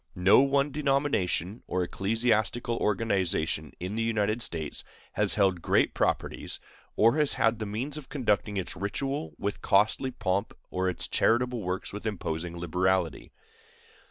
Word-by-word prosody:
No 90 Hz, +2 st, +6 dB
one 140 Hz, +1 st, +3 dB
denomination 135 Hz, -, 0 dB
or 90 Hz, 0 st, 0 dB
ecclesiastical 115 Hz, +5 st, 0 dB
organization 95 Hz, -7 st, 0 dB
in 90 Hz, +3 st, -4 dB
the 115 Hz, -, -1 dB
United 110 Hz, 0 st, 0 dB
States 80 Hz, -8 st, -4 dB, 0.3 s
has -, -, +2 dB
held 95 Hz, -4 st, +2 dB
great -, -, +2 dB
properties, -, -, -1 dB, 0.4 s
or 115 Hz, +6 st, +4 dB
has 150 Hz, -2 st, +2 dB
had 115 Hz, 0 st, +2 dB
the 110 Hz, -, -3 dB
means 125 Hz, +9 st, -3 dB
of 145 Hz, -4 st, -9 dB
conducting 110 Hz, -7 st, 0 dB
its 95 Hz, -, -3 dB
ritual 100 Hz, -, -3 dB
with 100 Hz, 0 st, -3 dB
costly 105 Hz, +6 st, +3 dB
pomp 100 Hz, -4 st, -2 dB, 0.2 s
or 95 Hz, 0 st, 0 dB
its 90 Hz, -, -3 dB
charitable 120 Hz, +1 st, +2 dB
works 90 Hz, 0 st, -3 dB
with 105 Hz, +2 st, -5 dB
imposing 85 Hz, -4 st, -3 dB
liberality. 90 Hz, -1 st, 0 dB
105 Hz, 140 wpm, -28 LUFS, 90-120 Hz, 0.4 s, No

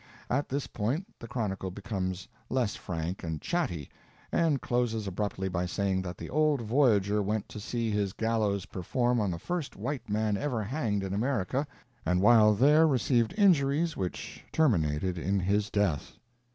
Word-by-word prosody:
At 140 Hz, +3 st, 0 dB
this 140 Hz, +1 st, -1 dB
point 130 Hz, -, -2 dB
the 115 Hz, -, -8 dB
chronicle 105 Hz, -5 st, -2 dB
becomes 95 Hz, -2 st, -4 dB, 0.2 s
less 120 Hz, -6 st, 0 dB
frank 85 Hz, +2 st, -4 dB
and 80 Hz, -2 st, -3 dB
chatty, 130 Hz, -, -2 dB, 0.4 s
and 160 Hz, -5 st, +2 dB
closes 120 Hz, -4 st, 0 dB
abruptly 95 Hz, 0 st, -2 dB
by 90 Hz, -1 st, -1 dB
saying 95 Hz, +1 st, 0 dB
that 90 Hz, -1 st, -6 dB
the -, -, -7 dB
old 150 Hz, -1 st, +3 dB
voyager 105 Hz, -4 st, +3 dB
went 105 Hz, +1 st, -1 dB
to -, -, -7 dB
see 115 Hz, +1 st, -2 dB
his 105 Hz, -2 st, 0 dB
gallows 105 Hz, -3 st, 0 dB
perform 120 Hz, +7 st, 0 dB
on 105 Hz, -3 st, +1 dB
the 85 Hz, -, -2 dB
first 170 Hz, -, -4 dB
white 125 Hz, +4 st, -4 dB
man 105 Hz, 0 st, +1 dB
ever 125 Hz, -5 st, -1 dB
hanged 105 Hz, -4 st, -1 dB
in 95 Hz, 0 st, -3 dB
America, 130 Hz, +4 st, 0 dB, 0.4 s
and 90 Hz, +2 st, +1 dB
while 105 Hz, 0 st, +6 dB
there 150 Hz, +8 st, +6 dB
received 125 Hz, -3 st, +2 dB
injuries 165 Hz, -5 st, +3 dB
which 90 Hz, -2 st, -5 dB
terminated 90 Hz, -, +1 dB
in 95 Hz, +4 st, 0 dB
his 100 Hz, +3 st, +1 dB
death. 100 Hz, -9 st, 0 dB
105 Hz, 160 wpm, -29 LUFS, 95-130 Hz, 0.4 s, while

